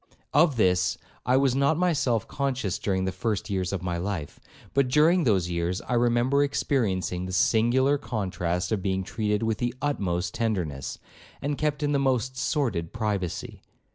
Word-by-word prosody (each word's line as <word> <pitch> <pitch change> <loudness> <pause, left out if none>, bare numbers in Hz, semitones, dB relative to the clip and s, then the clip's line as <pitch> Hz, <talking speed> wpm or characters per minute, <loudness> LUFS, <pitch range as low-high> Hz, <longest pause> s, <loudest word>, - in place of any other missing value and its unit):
Of 150 -1 +4
this 90 -5 +2 0.3
I 125 +1 +4
was 135 -2 +3
not 140 +3 +2
myself 135 -10 +1
conscious 130 -9 -2
during 95 -2 0
the 95 - 0
first 105 +2 -2
years 95 -2 -1
of 95 -3 -3
my 90 -1 -2
life; 90 -4 -4 0.3
but 135 0 +3
during 155 +6 +4
those 95 -7 +2
years, 85 +2 -1
I - - -4
remember 120 +4 +3
experiencing 95 - 0
the - - -5
singular 120 +9 +3
contrast 90 -7 -2
of 105 -3 0
being 95 0 -1
treated 105 0 -1
with 110 -2 0
the 120 0 -1
utmost 95 -11 -1
tenderness, 90 - -2 0.4
and 145 +1 -2
kept 150 0 -1
in 145 - +1
the 140 - +2
most 130 -1 0
sordid 120 - -1
privacy. 105 -6 -3
110 Hz, 165 wpm, -26 LUFS, 95-135 Hz, 0.4 s, Of